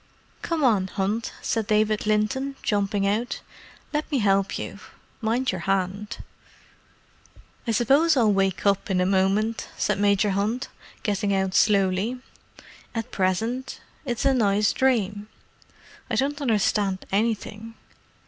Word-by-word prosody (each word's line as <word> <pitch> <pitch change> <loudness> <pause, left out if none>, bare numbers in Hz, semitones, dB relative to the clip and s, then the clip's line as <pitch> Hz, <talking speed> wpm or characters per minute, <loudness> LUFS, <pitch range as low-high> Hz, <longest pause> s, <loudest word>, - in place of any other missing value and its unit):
"Come 330 -3 -1
on, 210 -7 +3
Hunt," 205 +4 -2
said 225 -3 -1
David 215 0 +1
Linton, 240 +6 0
jumping 200 -1 0
out. 215 +5 -1 0.5
"Let 300 +1 -2
me 285 - +2
help 195 -3 +2
you—mind 235 +3 -4
your 185 -2 -4
hand." 195 +3 -1 1.5
"I - - +2
suppose 275 +8 +4
I'll 220 -4 +4
wake 195 -2 0
up 200 0 +2
in 185 -2 +1
a 180 - +2
moment," 195 +4 +1
said 210 -1 0
Major 200 0 +3
Hunt, 210 +6 -1 0.3
getting 205 -1 0
out 190 -1 0
slowly. 200 +4 +2 0.8
"At 225 +1 -3
present, 225 +8 -1 0.2
it's 245 -3 -3
a 275 - +5
nice 210 -4 +2
dream. 210 -6 +1 0.8
I - - 0
don't 290 +2 0
understand 205 -5 +1
anything. 220 +1 -2
210 Hz, 125 wpm, -25 LUFS, 195-235 Hz, 1.5 s, a